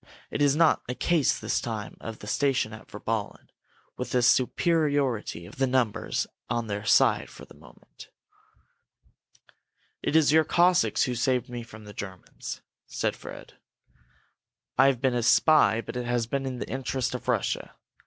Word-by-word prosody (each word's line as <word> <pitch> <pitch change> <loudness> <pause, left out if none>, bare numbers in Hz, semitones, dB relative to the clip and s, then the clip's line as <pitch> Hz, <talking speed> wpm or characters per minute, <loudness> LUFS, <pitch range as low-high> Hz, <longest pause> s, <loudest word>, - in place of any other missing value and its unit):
It - - -2
is 145 -1 +4
not 165 0 +4
a 125 - -2
case 165 -2 +2
this - - -1
time 110 -3 -5
of 115 -1 -6
the - - -11
station 130 -1 0
at 110 - -11
Virballen, 105 0 -4 0.5
with - - -4
the 125 -1 +3
superiority 135 - +1
of 90 - -13
numbers 125 -4 0 0.2
on 120 -1 -1
their 105 -1 -4
side - - +4
for - - -12
the - - -17
moment." - - -16 1.9
"It - - -1
is 155 -3 +5
your 160 +1 +5
Cossacks 175 +3 +3
who 125 - -1
saved 125 +1 0
me 120 -1 -5
from 110 -2 -12
the 105 - -10
Germans," 95 -2 -8 0.2
said - - -2
Fred. - - -11 1.2
"I 135 +1 +6
have 130 -3 +1
been 130 -2 +2
a 120 - 0
spy 115 0 +4
but 115 - -8
it 125 -1 -3
has 120 -1 0
been 135 +3 -2
in 130 -1 -4
the - - -5
interest 130 -1 -2
of 125 - -6
Russia. 120 -5 -1
125 Hz, 165 wpm, -27 LUFS, 110-140 Hz, 1.9 s, I